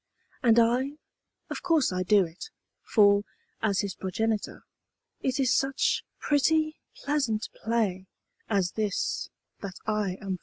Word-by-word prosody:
And 235 -2 +5
I 245 +4 +3 0.6
of - - -4
course 330 - +2
I 185 - -1
do 195 +1 +4
it; 170 - -9 0.3
for, 200 -2 +5 0.4
as 200 -3 +2
his 200 -3 -3
progenitor, 215 +4 -2 0.6
It 265 0 -1
is 255 -2 +3
such 270 0 +1 0.2
pretty, 310 +2 +2 0.3
pleasant 270 -7 0
play 210 -5 -1 0.4
as 195 -4 +1
this 210 -3 -1 0.3
that 195 -2 -6
I 210 -4 -1
am 195 -3 -3
for! - - -38
220 Hz, 130 wpm, -28 LUFS, 195-265 Hz, 0.6 s, And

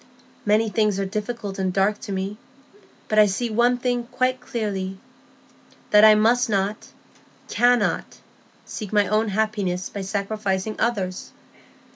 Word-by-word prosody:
Many 215 +2 +3
things 210 -2 +1
are 195 - -1
difficult 210 0 -4
and 190 -1 0
dark 200 +3 +1
to - - -7
me; 195 +2 -3 0.7
but 215 - +2
I 210 - +7
see 225 +4 -2
one 240 +3 +3
thing 245 -1 -1
quite 255 +1 -1
clearly,—that 200 0 -3
I 215 0 +9
must 230 +3 +3
not, 200 +1 -1 0.6
cannot, 245 0 +1 0.5
seek 210 -4 -7
my 205 -1 +3
own 215 +2 +1
happiness 200 -3 -1
by 200 - -6
sacrificing 200 0 -2
others. 195 -6 -2
210 Hz, 130 wpm, -23 LUFS, 195-225 Hz, 0.7 s, I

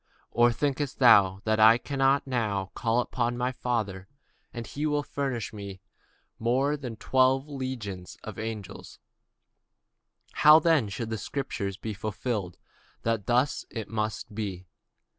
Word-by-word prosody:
Thinkest 140 +2 -2
thou 100 -6 +6
that 110 0 +1
I 110 +2 +8
cannot 135 +1 +1
now 105 -7 -1
pray 120 +1 +1
to 120 -1 +1
my 125 +1 0
Father, 110 -7 -3 0.4
and 120 -1 -6
he 145 - -7
shall 150 -1 +1
presently 135 -4 -3 0.3
give 95 -1 -9
me - - -50 0.6
more 130 +6 +1
than 130 -6 -6
twelve 130 +4 +2
legions 125 -10 -6
of 110 -3 -7
angels? 110 -3 -6 1.3
But - - -9
how 150 +1 +9
then 160 - +3
shall 115 +4 -4
the 110 -1 -4
scriptures 100 -5 -4
be 110 0 -5
fulfilled, 105 -2 -3 0.5
that 115 -4 -1
thus 125 +3 +2
it 115 -3 -6
must 110 -2 -3
be? 100 -4 -4
115 Hz, 140 wpm, -28 LUFS, 105-130 Hz, 1.3 s, how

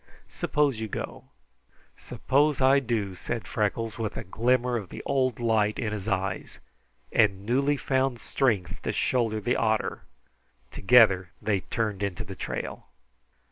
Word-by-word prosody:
Suppose 145 -6 0
you 110 - -3
go." - - -6 0.7
"Suppose 145 +2 +1
I 135 +1 +5
do," 110 -7 -2
said 115 +5 -5
Freckles, 110 +1 -2
with 110 -2 -3
a - - -4
glimmer 120 +5 +1
of 105 -6 -4
the - - -8
old 130 -4 +1
light 110 -3 +1
in 105 -2 -2
his 105 -1 -5
eyes 95 -2 -2 0.5
and 100 -3 +2
newly 140 +5 +2
found 130 -2 0
strength 100 -11 -1
to - - -2
shoulder 115 -4 0
the 120 +4 0
otter. 110 -1 0 0.7
Together 95 -5 +5
they 105 -3 0
turned 105 0 -3
into 100 -3 -2
the - - -9
trail. - - -5
115 Hz, 140 wpm, -27 LUFS, 105-125 Hz, 0.7 s, I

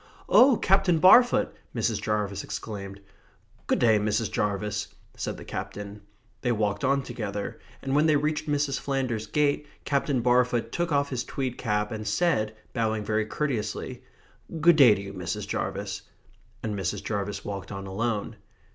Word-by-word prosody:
"Oh, 255 -2 +6
Captain 190 -3 +3
Barfoot!" 240 +9 +6 0.2
Mrs. 110 -2 0
Jarvis 105 -2 -1
exclaimed. 100 -1 -6 0.7
"Good - - +2
day, 110 -3 +4
Mrs. 105 +1 0
Jarvis," 105 0 -1 0.3
said - - -4
the - - -10
Captain. 105 0 -6 0.4
They 125 - +1
walked 105 +1 0
on 140 +1 +2
together, 105 -5 -5 0.2
and 135 0 -2
when 150 +2 +4
they 155 - +4
reached 150 +1 0
Mrs. 145 -1 0
Flanders's 130 -6 -2
gate 150 +1 +1 0.2
Captain 140 -2 +1
Barfoot 125 0 +2
took 175 -1 -1
off 140 -1 +2
his 125 -2 -1
tweed 130 -3 -3
cap, 105 -2 0
and 110 -1 -5
said, 110 -4 +1 0.2
bowing 110 -3 -1
very 110 0 0
courteously: 115 -7 -3 0.6
"Good 165 +1 +6
day 125 -8 +8
to - - -5
you, 100 - -8
Mrs. 90 +2 -4
Jarvis." - - -3 0.6
And 110 - -2
Mrs. 100 +1 -3
Jarvis 100 -1 -3
walked 100 -2 -5
on 95 0 -6
alone. 105 +2 -2
110 Hz, 155 wpm, -27 LUFS, 105-140 Hz, 0.7 s, day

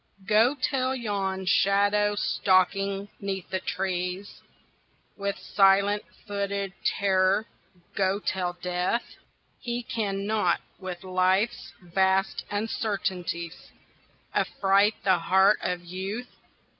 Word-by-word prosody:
Go 225 +6 +4
tell 260 -1 0
yon 195 -5 -2
shadow 205 +2 +3
stalking 195 +1 +1
'neath 195 -2 -4
the 190 - 0
trees 185 +1 -3 0.7
With 200 -1 -3
silent 200 +1 +3 0.2
footed 200 -2 -2
terror, 195 +1 +2 0.5
go 190 0 +1
tell 185 -3 -2
Death 180 +5 0 0.5
He 240 0 -3
cannot 205 -4 0 0.2
with 185 -2 -6
Life's 185 +4 +1
vast 190 +2 +1
uncertainties 190 -5 -3 0.6
Affright 200 +2 +2
the 190 -2 +3
heart 190 +3 +4
of 180 -1 -3
Youth 195 +7 -5
195 Hz, 95 wpm, -27 LUFS, 185-205 Hz, 0.7 s, Go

